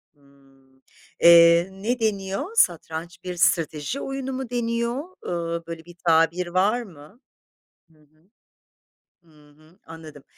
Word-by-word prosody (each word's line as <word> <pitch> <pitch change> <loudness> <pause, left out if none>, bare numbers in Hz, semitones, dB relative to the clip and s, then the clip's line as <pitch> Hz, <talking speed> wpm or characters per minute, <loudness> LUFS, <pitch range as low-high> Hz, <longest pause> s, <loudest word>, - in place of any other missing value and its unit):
Hımm. 135 -1 -27 0.4
Eee, 170 +1 +7
ne 220 +6 -3
deniyor, 215 - -3
satranç 170 - 0
bir 180 -1 -6
strateji 165 - 0
oyunu 270 -1 -5
mu 260 -2 -5
deniyor? 235 +2 -2 0.2
Eee, 170 -1 -4
böyle 165 -1 -8
bir 175 0 -14
tabir 165 +2 +3
var 195 +7 +1
mı? 180 0 -14 0.7
Hı 155 - -27
hı, 155 +4 -30 0.9
hı 150 -3 -22
hı. 155 +4 -24
Anladım. 160 -3 -12
170 Hz, 120 wpm, -23 LUFS, 155-210 Hz, 0.9 s, Eee